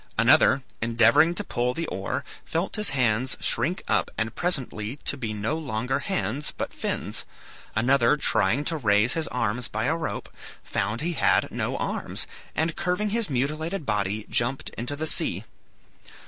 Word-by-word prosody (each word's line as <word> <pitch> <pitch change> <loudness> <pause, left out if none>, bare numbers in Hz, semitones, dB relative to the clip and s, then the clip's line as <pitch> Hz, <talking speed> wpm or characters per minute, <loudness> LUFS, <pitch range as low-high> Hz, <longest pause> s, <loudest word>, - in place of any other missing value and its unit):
Another, 130 +3 +5 0.2
endeavoring 115 +8 +5
to 205 - -1
pull 125 -6 -1
the 165 - -2
oar, 95 - -3 0.2
felt 165 +4 -2
his 210 -3 0
hands 125 -2 +1
shrink 150 +11 0
up - - +2
and 110 0 -1
presently 130 -9 -1
to - - -1
be 120 -6 -4
no 105 +7 -1
longer 125 -2 -1
hands 140 - -2
but - - -3
fins; - - -3 0.5
another, 120 +3 +4
trying 130 -2 +2
to 165 - +1
raise 105 -2 +3
his 160 -1 -1
arms 120 0 -1
to - - -6
a 160 - +2
rope, 165 - -4 0.4
found 105 +4 -2
he 170 +2 -1
had - - +2
no - - -2
arms, - - -3 0.3
and 160 +1 0
curving 195 +2 0
his 230 -3 +1
mutilated 155 +6 -1
body, 105 -1 -1
jumped 120 +3 0
into 125 +5 -4
the 155 +2 -3
sea. - - +2
130 Hz, 160 wpm, -26 LUFS, 115-160 Hz, 0.5 s, Another